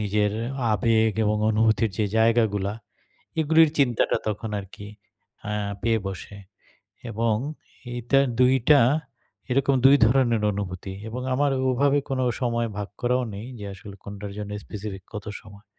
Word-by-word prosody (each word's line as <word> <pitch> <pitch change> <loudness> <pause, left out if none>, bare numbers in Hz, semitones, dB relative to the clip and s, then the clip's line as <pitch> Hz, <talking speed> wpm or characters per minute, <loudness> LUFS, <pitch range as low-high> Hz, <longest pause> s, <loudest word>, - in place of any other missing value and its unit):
নিজের 105 0 +1 0.4
আবেগ 110 +1 +3
এবং 105 0 +2
অনুভূতির 110 0 +2
যে 105 - +2
জায়গাগুলা 110 -3 +2 0.7
এগুলির 160 0 +5
চিন্তাটা 125 -5 +2
তখন 105 +1 -3
আরকি 100 +1 -11 0.6
আ - - -2 0.3
পেয়ে 115 0 +2
বসে। 95 +2 -8 0.7
এবং 115 0 +1 0.6
এইটা 120 +3 +2 0.2
২-টা 130 +3 +5 0.7
এরকম 135 +2 +2
২ 140 +1 +8
ধরনের 120 -3 +2
অনুভূতি। 95 -1 -5 0.2
এবং 125 +3 -5
আমার 145 +1 +2 0.2
ওভাবে 140 +3 +3
কোন 130 -1 0 0.2
সময় 120 -2 0
ভাগ 100 - -4
করাও 125 +1 +1
নেই 105 +4 -7
যে - - -6
আসলে 100 +1 -11
কোনটার 100 0 -7
জন্য 105 -1 -5
স্পেসিফিক 100 -2 -7
কত 105 - -5 0.2
সময়। 100 0 -15
110 Hz, 135 wpm, -25 LUFS, 105-125 Hz, 0.7 s, ২